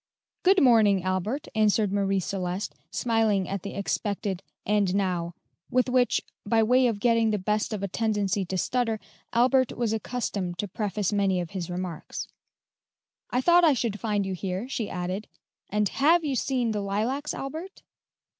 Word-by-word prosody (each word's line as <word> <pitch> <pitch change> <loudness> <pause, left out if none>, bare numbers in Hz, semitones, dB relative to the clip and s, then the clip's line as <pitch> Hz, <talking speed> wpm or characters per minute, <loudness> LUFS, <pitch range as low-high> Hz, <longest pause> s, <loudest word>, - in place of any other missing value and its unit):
"Good 375 -2 +5
morning, 215 -7 +5
Albert," 185 +9 -2
answered 215 -2 +2
Marie 195 -1 +1
Celeste, 185 +1 -3 0.2
smiling 220 -5 +1
at 195 -1 -3
the 200 - -7
expected, 200 -1 -2 0.2
"and 205 -2 +2
now," 175 -3 -1 0.3
with 255 0 +2
which, 250 -1 +3 0.2
by 225 +2 +3
way 250 +3 +4
of 225 -4 -1
getting 230 0 +3
the 210 - +1
best 210 +4 -1
of 210 -2 -3
a - - 0
tendency 205 -1 0
to 185 +1 -3
stutter, 230 +3 0 0.3
Albert 255 +2 +3
was 230 -3 0
accustomed 210 -6 -3
to 205 - -2
preface 205 0 -2
many 195 -2 +2
of 175 -2 -4
his 180 -3 -4
remarks; 180 -2 -5 1.0
"1 250 +1 0
thought 350 +2 +6
I 315 -3 +6
should 225 -4 -2
find 210 -3 0
you 190 - -2
here," 185 +4 -3
she 235 -5 -3
added; 185 +4 -4 0.4
"and 210 0 +1
have 320 - +3
you 285 -3 -1
seen 250 -2 0
the 210 -1 -1
lilacs, 220 +9 -1
Albert?" 320 +8 -7
210 Hz, 165 wpm, -27 LUFS, 195-245 Hz, 1.0 s, thought